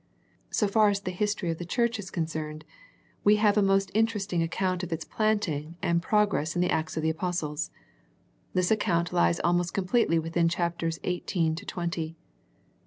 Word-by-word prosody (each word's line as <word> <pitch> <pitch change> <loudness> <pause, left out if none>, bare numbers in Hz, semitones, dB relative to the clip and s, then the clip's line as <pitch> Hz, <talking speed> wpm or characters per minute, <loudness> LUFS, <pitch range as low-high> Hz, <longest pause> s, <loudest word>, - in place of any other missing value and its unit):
So 210 - +1
far 210 +1 +4
as 200 -1 0
the 185 - -3
history 205 -2 -1
of 165 - -5
the - - -4
church 235 +5 0
is 190 -2 -6
con 170 -4 -1
cerned, 155 -1 -5 0.6
we 210 +1 +6
have 210 -1 +3
a 210 - +4
most 195 -1 +2
interesting 210 -5 +1
account 180 +2 -1
of 180 -2 -5
its 165 0 -3
planting 170 -8 -1
and 170 0 +1
progress 205 -6 +1
in 175 - +1
the 180 - +1
Acts 160 0 -1
of 160 - -1
the 160 - +2
Apostles. 160 -2 -2 0.9
This 180 +1 +2
account 175 -6 +1
lies 85 0 +3
almost 175 0 +1
completely 190 -2 +2
within 165 +1 +1
chapters 170 -1 -1
eighteen 175 -2 0
to 185 +6 -7
twenty. 170 -2 -3
175 Hz, 175 wpm, -28 LUFS, 165-205 Hz, 0.9 s, we